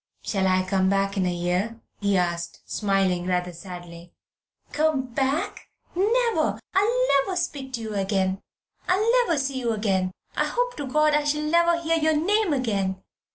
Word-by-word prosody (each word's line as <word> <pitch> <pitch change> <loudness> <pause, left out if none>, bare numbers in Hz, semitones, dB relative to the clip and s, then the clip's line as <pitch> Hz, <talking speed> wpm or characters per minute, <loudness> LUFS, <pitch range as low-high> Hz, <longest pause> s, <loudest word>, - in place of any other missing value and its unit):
"Shall 190 -2 0
I 185 0 +3
come 190 0 +1
back 195 0 +1
in 190 -2 +1
a - - +1
year?" 180 +6 -1 0.2
he 200 -2 +2
asked, 170 -1 -2
smiling 195 -3 0
rather 180 -1 -1
sadly. 175 -1 -10 0.6
"Come 290 -5 0
back? 275 +4 -1 0.3
Never! 460 +5 +1
I'll 470 +6 +2
never 370 +7 -2
speak 290 -7 -3
to 235 - -3
you 220 -1 -5
again. 195 -1 0 0.5
I'll 390 +5 +2 0.2
never 330 - +1
see 270 -1 -1
you 235 -2 0
again. 195 -4 0 0.3
I - - +2
hope - - -1
to 285 - -4
God 305 +3 +3
I 300 0 +3
shall 300 +1 0
never 340 +2 +3
hear 330 0 +1
your 315 0 +2
name 400 +5 +2
again. 200 -8 0
230 Hz, 165 wpm, -25 LUFS, 190-315 Hz, 0.6 s, I